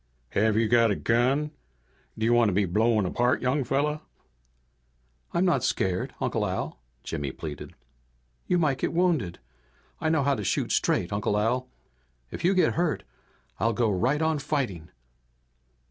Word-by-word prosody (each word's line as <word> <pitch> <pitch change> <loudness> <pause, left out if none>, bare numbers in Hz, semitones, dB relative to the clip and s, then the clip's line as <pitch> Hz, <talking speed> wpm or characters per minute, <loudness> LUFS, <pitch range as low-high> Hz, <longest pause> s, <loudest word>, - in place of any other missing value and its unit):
"Have 110 +5 +2
you 115 0 +3
got 115 0 +4
a 100 - +1
gun? 130 +8 +1 0.7
Do 110 - -1
you 120 - +4
want 120 -2 +4
to - - -1
be 100 +2 +2
blown 110 +3 +2
apart, 120 +8 +1
young 135 +3 +1
fella?" 145 +4 0 1.3
"I'm 175 +2 +1
not 155 -9 +2
scared, 95 -1 -1
Uncle - - -1
Al," - - -3 0.2
Jimmy 70 -2 -3
pleaded. 75 +1 -8 0.7
"You 180 - +2
might 150 -6 +1
get - - -1
wounded. 165 - +1 0.6
I 160 - 0
know 155 -3 +2
how 140 +1 +2
to 110 -6 -3
shoot - - 0
straight, 85 - +1
Uncle 105 0 0
Al. 125 +4 0 0.6
If - - -6
you 185 +3 +3
get 185 - +3
hurt 170 -2 0 0.6
I'll 115 0 +2
go 115 -1 +1
right 130 - +1
on 160 -1 +1
fighting!" 110 - -2
120 Hz, 160 wpm, -27 LUFS, 105-150 Hz, 1.3 s, got